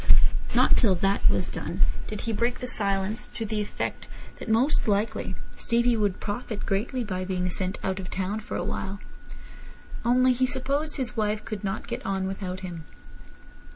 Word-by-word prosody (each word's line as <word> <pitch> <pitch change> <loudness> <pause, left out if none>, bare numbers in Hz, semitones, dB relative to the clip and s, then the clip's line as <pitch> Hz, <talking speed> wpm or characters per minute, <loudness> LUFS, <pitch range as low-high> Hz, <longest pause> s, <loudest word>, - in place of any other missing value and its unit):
Not - - +6
till 200 -6 +4
that 195 +3 +3
was - - +1
done - - -4 0.3
did 210 - -4
he 230 - -1
break 235 +3 +1
the - - -5
silence, 205 0 0
to 225 - -1
the 215 0 -1
effect 210 - -3 0.3
that - - -6
most 245 +5 +3
likely 205 +1 0 0.2
Stevie 235 0 +2
would 205 -4 +1
profit 210 0 -3
greatly 240 +6 0
by 185 -4 -2
being 180 -1 -1
sent 185 +2 -2
out 190 0 -1
of 185 -1 -5
town 195 +3 -1
for 215 - -4
a - - -1
while; 195 +1 -3 1.0
only 255 +2 +5
he 255 +1 +2
supposed 280 +3 +1
his 250 -3 -1
wife 215 -1 0
could 215 -1 -5
not 195 +1 -2
get 245 +1 -4
on 195 -1 0
without 185 -1 -4
him. 175 -3 -6
210 Hz, 175 wpm, -27 LUFS, 195-240 Hz, 1.0 s, Not